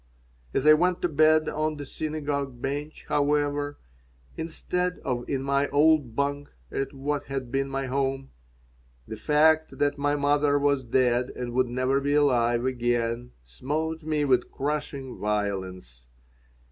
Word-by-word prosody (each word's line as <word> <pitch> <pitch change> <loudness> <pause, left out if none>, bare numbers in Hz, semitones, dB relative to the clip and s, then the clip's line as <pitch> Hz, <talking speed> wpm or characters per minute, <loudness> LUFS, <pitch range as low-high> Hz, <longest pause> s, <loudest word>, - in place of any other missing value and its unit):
As 130 - -1
I 155 - +9
went 175 +3 +1
to - - +4
bed 155 0 +4
on 155 0 -1
the 145 - -6
synagogue 145 -4 -3
bench, 145 +4 -4
however, 145 0 0 0.6
instead 180 +2 -2
of 125 -3 -2
in 135 -1 -1
my 140 +1 +1
old 145 -4 +3
bunk 140 +1 -1 0.2
at 135 - -2
what 145 +1 -3
had 135 -3 -5
been 135 0 0
my 135 0 -2
home, 135 0 -2 0.8
the - - -5
fact 155 +1 +3
that 145 0 0
my 145 +1 +1
mother 145 0 +2
was 140 -1 +1
dead 125 0 +2
and 120 -1 -5
would 130 0 +2
never 130 +3 0
be 145 +1 +1
alive 120 -4 +3
again 120 -1 -1
smote 155 - -3
me 150 -1 0
with 130 -3 +2
crushing 140 -2 -4
violence. 95 -12 -3
140 Hz, 145 wpm, -26 LUFS, 125-150 Hz, 0.8 s, I